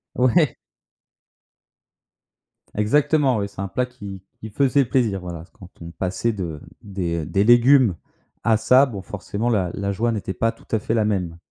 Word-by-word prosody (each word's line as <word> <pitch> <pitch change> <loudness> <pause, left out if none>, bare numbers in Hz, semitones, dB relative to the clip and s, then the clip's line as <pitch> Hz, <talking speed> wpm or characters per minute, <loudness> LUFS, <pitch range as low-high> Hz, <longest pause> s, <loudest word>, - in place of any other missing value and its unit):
Ouais. 130 +3 +3 2.2
Exactement, 140 +4 +2
oui, 100 - -2
c'est 100 - -16
un 100 - -3
plat 125 +6 -1
qui 100 -7 -10 0.2
qui 110 - -7
faisait 140 +2 +2
plaisir. 115 -6 0
Voilà, 85 -2 -7
quand 90 - -14
on 85 - -8
passait 95 +6 -2
de 85 -7 -5 0.2
des, 90 -5 -3
heu, - - -6
des 95 +6 +1
légumes 120 -3 +5 0.5
à 115 -1 +3
ça, 130 +5 +5
bon, 105 -7 -7
forcément, 105 +4 -4
la 95 -6 0
la 100 0 -2
joie 115 +4 0
n'était 105 -4 -3
pas 115 +5 0
tout - - -21
à 110 - +2
fait 110 - -3
la 110 -2 +2
même. 90 -5 -2
105 Hz, 170 wpm, -22 LUFS, 95-125 Hz, 2.2 s, légumes